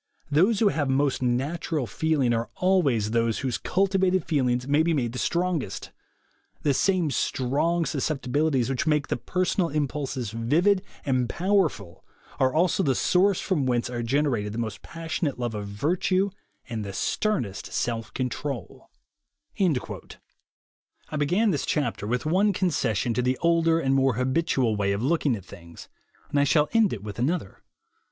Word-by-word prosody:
Those 190 +9 +3
who 210 - +5
have 145 -4 -1
most 135 0 +1
natural 140 +4 -1
feeling, 135 +2 +1
are 115 -1 -1
always 145 - +2
those 115 -1 +1
whose 125 -3 -1
cultivated 190 -1 +1
feelings 125 -4 0
may 145 +2 +3
be 165 0 +2
made 120 -5 -1
the 125 - -4
strongest. 170 - -1 0.7
The 145 - +3
same 180 0 +1
strong 150 +8 0
sus 145 -2 -1
ceptibilities 140 -2 0
which 135 +4 -2
make 150 -2 +1
the - - +1
personal 185 -1 0
impulses 140 -5 -2
vivid 160 - +2 0.2
and 130 -3 +1
powerful 175 - 0 0.4
are 130 -1 +3
also 165 +4 +2
the 135 -3 +1
source 185 +6 +3
from 150 -9 0
whence 120 -1 0
are 120 -1 -3
generated 120 -4 0
the - - -5
most 115 -2 -4
passionate 165 -3 -3
love 120 -2 -3
of 105 -1 -4
virtue, 180 - 0 0.4
and 115 -4 -4
the 100 -1 -6
sternest 125 - -2
self 115 -3 -2
control," 130 -3 -4 0.7
I 185 -4 +4 1.4
began 180 +9 +2
this 145 - -1
chapter 140 -8 -1
with 125 +5 -1
one 195 +6 +3
concession 130 - 0
to 125 - 0
the 125 +1 0
older 165 -1 +3
and 135 -4 +1
more 135 -2 +3
habitual 130 -2 +1
way 100 -1 0
of 100 +3 -2
looking 145 -3 +1
at 95 -4 -9
things, 85 -3 -12 0.4
and 145 - +2
I - - +5
shall 150 +1 +3
end 225 -4 +4
it 100 - -5
with 105 0 -7
another. 160 +9 -1
140 Hz, 160 wpm, -26 LUFS, 120-170 Hz, 1.4 s, who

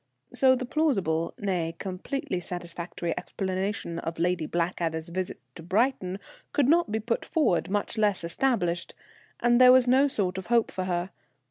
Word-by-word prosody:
So 260 -1 +5
the 255 0 -3
plausible, 195 - 0
nay, 175 -5 -2
completely 190 +2 -4
satisfactory 175 -1 -4
explanation 190 -2 -3
of 165 0 -5
Lady 170 -1 0
Blackadder's 170 -1 -2
visit 185 +1 -4
to 165 - -10
Brighton 190 +1 0 0.4
could 285 -4 +3
not 335 -5 +3
be 220 - 0
put 230 +2 -2
forward, 195 - +1
much 205 +2 -1
less 205 -4 +2
established, 175 -2 -1 0.5
and 240 +1 +4
there 250 0 +9
was 255 -1 +6
no 265 +3 +5
sort 190 -8 -1
of 190 - -9
hope 235 -1 +2
for 185 0 -3
her. 180 0 -2
190 Hz, 155 wpm, -27 LUFS, 175-240 Hz, 0.5 s, there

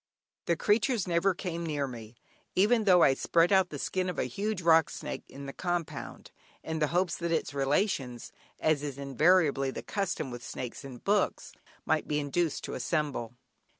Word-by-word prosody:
The 170 - +2
creatures 210 +3 +1
never 175 +2 +2
came 170 -2 -4
near 150 -4 -1
me, 115 -2 -9 0.4
even 215 +4 +4
though 180 -3 +6
I 135 - +6
spread 165 +6 +2
out 190 -1 +4
the 145 - -6
skin 185 +6 -1
of 180 - -5
a - - +1
huge 205 -2 -3
rock 165 -2 +5
snake - - -6
in 140 0 -9
the 135 - -6
compound, 175 -3 -4 0.3
in 160 0 -3
the 150 - +2
hopes 175 +2 +1
that 170 -1 -2
its 160 -3 0
relations 135 - -1 0.3
(as 155 -2 +2
is 145 -2 -5
invariably 140 0 +3
the - - -6
custom 190 -9 -2
with 120 0 -7
snakes 125 -1 -6
in 135 -3 -8
books) 200 +7 0 0.3
might 155 0 +1
be 150 - 0
induced 150 +2 -1
to - - -5
assemble. 130 -3 -2
160 Hz, 180 wpm, -29 LUFS, 140-185 Hz, 0.4 s, though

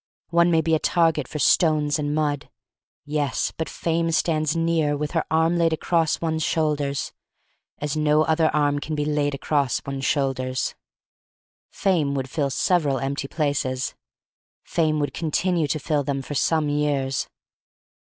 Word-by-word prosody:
One 170 0 +4
may 165 -2 +3
be 160 +1 0
a 160 - +3
target 165 -5 +2
for 155 - -6
stones 150 0 +3
and 145 0 -1
mud. 150 -2 -1 0.6
Yes 145 -4 -1
— - - -51
but 160 - -3
Fame 165 0 -1
stands 155 -1 +1
near 165 -3 +1
with 150 0 -3
her 165 -2 0
arm 160 +2 +2
laid 165 -1 +3
across 165 0 +1
one's 160 -1 -1
shoulders 150 -3 -1 0.3
— - - -47
as 150 -1 -1
no 155 0 +3
other 160 0 +2
arm 145 -1 +1
can 155 +2 -4
be 150 0 -1
laid 145 -1 0
across 140 -2 0
one's 135 -1 -4
shoulders. 130 -2 0 1.0
Fame 160 -8 0
would 130 -1 -3
fill 145 -3 0
several 145 -1 +1
empty 140 +2 -3
places. 140 -4 -1 0.7
Fame 155 -2 0
would 145 -2 -1
continue 165 +1 0
to 155 - -1
fill 150 0 -1
them 135 0 -2
for 145 - -6
some 155 +1 +1
years. 145 -2 0
150 Hz, 160 wpm, -24 LUFS, 140-160 Hz, 1.0 s, One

